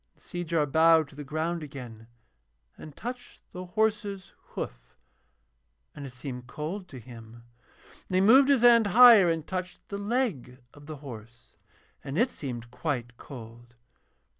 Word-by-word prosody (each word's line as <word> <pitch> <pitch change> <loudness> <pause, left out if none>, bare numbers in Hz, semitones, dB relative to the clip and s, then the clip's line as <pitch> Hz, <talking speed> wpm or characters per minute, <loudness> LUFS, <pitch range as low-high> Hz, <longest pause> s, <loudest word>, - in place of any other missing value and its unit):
And - - -23
Seejar 170 -3 -2
bowed 160 +1 +4
to - - -17
the 145 - -7
ground 160 +4 -3
again 125 -6 -10 0.7
and 150 -2 -12
touched 245 +1 -8
the 180 0 -7
horse's 205 -1 -2 0.2
hoof, - - -7 1.0
and 140 -2 -8
it - - -10
seemed 125 -1 -8
cold 170 +9 -6
to 140 - -11
him. 115 -1 -13 0.7
And 185 - -2
he - - +4
moved 260 +7 +6
his 275 -4 +4
hand 235 -3 +6
higher 220 -3 +8
and 165 -2 -2
touched 185 -1 -6
the 200 - -5
leg 205 - -2 0.2
of 145 0 -16
the 155 - -6
horse, 115 - -12 0.5
and 135 +3 -5
it 240 +5 +2
seemed 120 -4 -7
quite 125 -4 -4
cold. 120 -2 -12
155 Hz, 150 wpm, -27 LUFS, 125-200 Hz, 1.0 s, higher